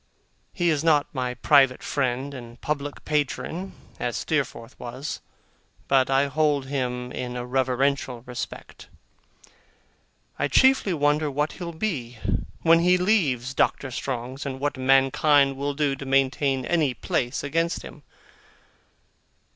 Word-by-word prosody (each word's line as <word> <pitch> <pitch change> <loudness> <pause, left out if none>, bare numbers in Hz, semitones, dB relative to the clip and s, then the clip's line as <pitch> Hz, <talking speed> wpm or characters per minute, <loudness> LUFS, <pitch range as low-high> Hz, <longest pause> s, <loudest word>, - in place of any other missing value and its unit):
He 175 -2 0
is 150 -1 0
not 155 -3 +3
my 125 -2 -2
private 135 +1 +4
friend 130 +1 -1
and 120 -2 -10
public 145 -1 -4
patron, 155 +5 -2 0.3
as 120 -1 -2
Steerforth 130 -6 -3
was, 125 +4 -6 0.7
but 135 -1 +3
I 135 +1 +3
hold 145 -1 +1
him 125 -2 -3
in 125 -1 -5
a 125 0 -4
reverential 130 -1 0
respect. 125 -1 -8 1.5
I - - +2
chiefly 260 -8 +4
wonder 150 0 +2
what 150 +2 -1
he'll 175 -2 -6
be, 150 - -3 0.5
when 165 0 +6
he 180 +2 +4
leaves 150 - +1
Doctor 135 0 0
Strong's, 130 +2 -4
and 135 -2 -5
what 145 +1 -1
mankind 135 +2 +4
will 140 +1 -3
do 145 -2 +1
to 140 - -8
maintain 135 0 +1
any 155 -7 +1
place 120 +3 -2
against 165 +4 -1
him. 150 - -11
140 Hz, 130 wpm, -25 LUFS, 130-150 Hz, 1.5 s, when